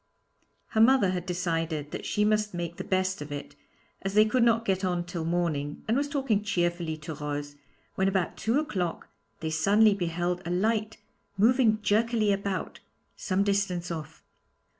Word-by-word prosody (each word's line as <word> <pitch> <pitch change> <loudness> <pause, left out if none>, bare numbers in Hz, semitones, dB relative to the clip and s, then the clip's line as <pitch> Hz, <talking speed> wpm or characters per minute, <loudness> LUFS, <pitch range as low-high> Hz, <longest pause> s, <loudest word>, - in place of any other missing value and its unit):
Her 220 - +2
mother 230 -5 +5
had 180 0 -4
decided 165 -4 -2
that - - -5
she 210 - +1
must 210 -2 +1
make 170 -1 -4
the - - -4
best 185 -2 0
of 145 0 -7
it, 145 0 -6 0.5
as 195 +1 -3
they 215 0 +7
could 245 +4 +1
not 230 -1 +3
get 190 -1 0
on 175 -2 0
till 175 -2 -4
morning, 160 -4 -1
and 225 - +2
was 285 +2 +1
talking 270 -8 0
cheerfully 175 -5 -1
to 155 +1 -7
Rose, 145 -1 -5 0.4
when 190 - +1
about 190 -3 0
two 230 +4 0
o'clock 185 - -3 0.3
they 160 -1 -2
suddenly 205 +7 +4
beheld 175 -1 -2
a 170 - -5
light 215 +4 0 0.4
moving 220 0 +3
jerkily 215 +1 +2
about, 200 -1 -2 0.4
some 190 0 0
distance 195 -4 0
off. 160 -3 -7
190 Hz, 165 wpm, -28 LUFS, 170-215 Hz, 0.5 s, they